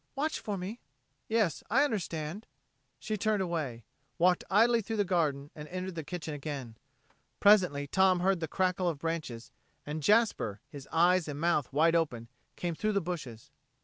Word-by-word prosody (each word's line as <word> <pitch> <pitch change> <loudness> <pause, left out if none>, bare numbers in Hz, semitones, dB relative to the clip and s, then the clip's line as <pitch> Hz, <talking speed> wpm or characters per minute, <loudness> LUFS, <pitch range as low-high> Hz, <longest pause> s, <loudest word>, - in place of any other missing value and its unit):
Watch 305 +3 -1
for 205 -2 -4
me." 195 +6 -6 0.5
"Yes 220 -8 +1
I 265 +6 +4
understand." 185 - -3 0.5
She 215 -2 -3
turned 210 -1 +1
away, 150 -10 -3 0.3
walked 180 0 +3
idly 230 +4 +4
through 225 +2 -4
the 205 -2 +1
garden, 150 -6 0
and 150 0 -8
entered 185 +2 -5
the 160 -2 -5
kitchen 160 -1 -5
again. 140 -5 -6 0.6
Presently 180 -9 +5
Tom 185 +3 +3
heard 190 0 +2
the 160 - -3
crackle 180 +1 0
of 160 - -3
branches, 155 -7 -4 0.3
and 150 +1 -4
Jasper, 205 - +2
his 140 -1 -10
eyes 175 +1 +3
and 145 -1 -5
mouth 150 -5 +1
wide 160 +4 +3
open, 120 -9 -1 0.3
came 175 -1 -2
through 215 +6 -1
the 200 - +3
bushes. 155 - -6
170 Hz, 165 wpm, -30 LUFS, 150-195 Hz, 0.6 s, Presently